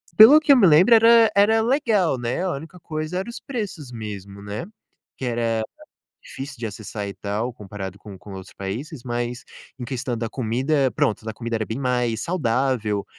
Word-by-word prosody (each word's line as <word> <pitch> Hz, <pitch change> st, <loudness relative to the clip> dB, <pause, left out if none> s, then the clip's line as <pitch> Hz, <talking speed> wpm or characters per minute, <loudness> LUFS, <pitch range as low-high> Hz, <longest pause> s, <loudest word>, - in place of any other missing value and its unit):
pelo 250 Hz, +8 st, +10 dB
que 295 Hz, -2 st, +5 dB
eu -, -, +6 dB
me 205 Hz, -, +6 dB
lembre 180 Hz, +9 st, +7 dB
era 230 Hz, 0 st, +6 dB
era 220 Hz, +3 st, +4 dB
legal, 220 Hz, -, +2 dB
né, 120 Hz, +7 st, -2 dB
a 180 Hz, -, 0 dB
única 160 Hz, +5 st, -9 dB
coisa 155 Hz, +2 st, -4 dB
era 205 Hz, +5 st, -5 dB
os 235 Hz, -, -8 dB
preços 200 Hz, -, -5 dB
mesmo, 100 Hz, -3 st, -8 dB
né, 105 Hz, +7 st, -5 dB, 0.5 s
que 130 Hz, -, -5 dB
era 115 Hz, -2 st, 0 dB, 0.6 s
difícil 140 Hz, +1 st, -8 dB
de 115 Hz, -, -5 dB
acessar 105 Hz, -1 st, -6 dB
e 100 Hz, -, -6 dB
tal 110 Hz, +4 st, -3 dB
comparado 100 Hz, -2 st, -8 dB
com 100 Hz, -3 st, -11 dB
com 100 Hz, 0 st, -11 dB
outros 95 Hz, -1 st, -9 dB
países, 120 Hz, -, -6 dB
mas 120 Hz, 0 st, -4 dB, 0.3 s
em 120 Hz, -, -5 dB
questão 125 Hz, -2 st, -3 dB
da 115 Hz, 0 st, -2 dB
comida, 130 Hz, +4 st, 0 dB
pronto, 110 Hz, -, 0 dB
da 110 Hz, -, -4 dB
comida 115 Hz, 0 st, -4 dB
era 110 Hz, -1 st, -1 dB
bem 115 Hz, +5 st, -5 dB
mais 125 Hz, -3 st, 0 dB
saudável, 125 Hz, -, 0 dB
125 Hz, 185 wpm, -23 LUFS, 110-170 Hz, 0.6 s, pelo